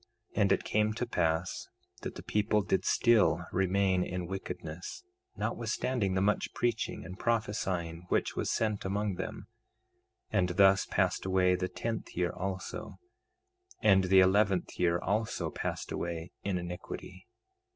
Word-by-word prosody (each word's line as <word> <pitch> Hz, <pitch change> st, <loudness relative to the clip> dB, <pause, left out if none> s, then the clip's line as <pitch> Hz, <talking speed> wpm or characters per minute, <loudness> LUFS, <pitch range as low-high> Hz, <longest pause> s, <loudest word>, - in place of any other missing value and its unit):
2:10 105 Hz, -, +1 dB
And 100 Hz, -1 st, +4 dB
it -, -, +3 dB
came 110 Hz, 0 st, +1 dB
to 120 Hz, +3 st, -2 dB
pass 80 Hz, -6 st, -1 dB, 0.3 s
that -, -, -5 dB
the -, -, -8 dB
people 105 Hz, 0 st, +1 dB
did 95 Hz, -, 0 dB
still 115 Hz, -3 st, +4 dB
remain 95 Hz, 0 st, +2 dB
in 90 Hz, -1 st, -3 dB
wickedness, 90 Hz, -, -6 dB, 0.3 s
notwithstanding 105 Hz, -8 st, -1 dB
the 95 Hz, -, +2 dB
much 105 Hz, +1 st, +1 dB
preaching 120 Hz, -2 st, -1 dB
and 95 Hz, +1 st, -9 dB
prophesying 95 Hz, -7 st, -1 dB
which -, -, +1 dB
was -, -, -1 dB
sent 110 Hz, -2 st, 0 dB
among 100 Hz, +1 st, -1 dB
them; 95 Hz, +1 st, -5 dB, 0.9 s
and 90 Hz, -1 st, +2 dB
thus 95 Hz, 0 st, +6 dB
passed -, -, +1 dB
away 95 Hz, -1 st, +3 dB
the 90 Hz, 0 st, -1 dB
tenth 115 Hz, -1 st, -4 dB
year 90 Hz, 0 st, +1 dB
also; 95 Hz, 0 st, -5 dB, 0.9 s
and 95 Hz, -1 st, +5 dB
the 95 Hz, +1 st, +6 dB
eleventh 95 Hz, 0 st, +2 dB
year 85 Hz, -1 st, +3 dB
also 105 Hz, +5 st, -1 dB
passed -, -, -4 dB
away 85 Hz, 0 st, -4 dB
in 100 Hz, -2 st, -1 dB
iniquity. 90 Hz, +1 st, -7 dB
95 Hz, 140 wpm, -31 LUFS, 90-105 Hz, 0.9 s, thus